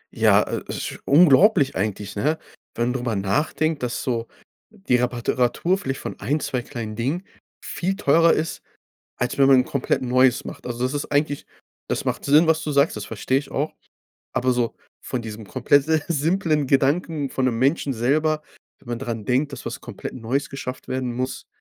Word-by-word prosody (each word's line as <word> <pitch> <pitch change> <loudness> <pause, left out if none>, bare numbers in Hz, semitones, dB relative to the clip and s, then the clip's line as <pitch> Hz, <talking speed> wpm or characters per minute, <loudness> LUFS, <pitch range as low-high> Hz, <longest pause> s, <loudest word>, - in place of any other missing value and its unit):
Ja, - - +5
äh - - -4
esch - - -5
unglaublich 155 +1 +5
eigentlich, 100 0 -3
ne? 150 +10 +1 0.4
Wenn 120 +1 0
drüber 125 -3 -2
nachdenkt, 150 +10 0
dass 125 -1 -2
so 115 -2 -2 0.4
die 195 - -1
Repara 125 -1 -1
Teratur 130 +9 +2
vielleicht 135 -4 -4
von - - -6
1, 150 +3 0
2 125 -4 -2
kleinen 115 -4 -6
Dingen 135 - -2 0.4
viel 190 +2 -2
teurer 165 0 +4
ist, 160 +1 -2 0.6
als 125 +2 -2
wenn 135 - +6
man 135 - +7
'n 125 - +3
komplett 140 -1 -1
Neues 130 0 +3
macht. - - -8
Also, 120 0 -3
das 130 +2 0
ist 145 - -2
eigentlich 145 0 0 0.4
das - - -2
macht - - -2
Sinn, 150 +4 +6
was 160 0 +2
du 150 - -2
sagst. 140 +2 +3
Das - - -5
verstehe 130 +1 0
ich 140 - -10
auch. 150 +3 -2 0.6
Aber 130 0 +1
so 120 -2 0 0.3
von 125 - -3
diesem 110 -1 -8
komplett 135 +5 +2
äh, 160 -1 +2
simplen 160 -2 +1
Gedanken 140 +2 +1
von 130 - 0
'nem 120 -3 +1
Menschen 135 +2 +1
selber, 150 +6 +1 0.4
wenn 125 - -15
man 120 -1 -3
dran 115 -3 -4
denkt, 135 +5 +1
dass 135 - -8
was - - -5
komplett - - -7
Neues 130 +4 -2
geschafft 130 -2 -6
werden 130 -1 -2
muss, 130 +1 -4
135 Hz, 185 wpm, -23 LUFS, 125-150 Hz, 0.6 s, man